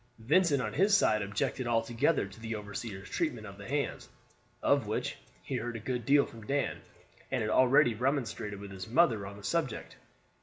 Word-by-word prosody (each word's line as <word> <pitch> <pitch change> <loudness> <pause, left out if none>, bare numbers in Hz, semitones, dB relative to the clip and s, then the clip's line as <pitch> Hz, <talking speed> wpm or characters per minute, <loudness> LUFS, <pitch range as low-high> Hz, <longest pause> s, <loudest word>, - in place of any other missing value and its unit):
Vincent 145 +3 +3
on - - -3
his 200 +1 +5
side 110 - +3
objected 100 +5 -2
altogether 115 +4 +2
to 100 +2 -12
the 115 0 -4
overseer's 100 -1 -6
treatment 110 - -2
of 100 -1 -10
the 100 - -8
hands, 140 +2 -2 0.5
of - - +3
which - - -2 0.3
he - - -3
heard 120 0 -4
a - - -4
good 120 +1 -3
deal 140 0 +6
from 115 -1 -12
Dan, 140 0 -1 0.5
and 130 -3 0
had 105 - -1
already 130 +1 +5
remonstrated 115 -4 -2
with 100 -1 -8
his 95 -2 -7
mother 115 - +3
on 100 +1 -9
the 100 - -13
subject. 150 +1 -2
115 Hz, 185 wpm, -31 LUFS, 105-140 Hz, 0.5 s, deal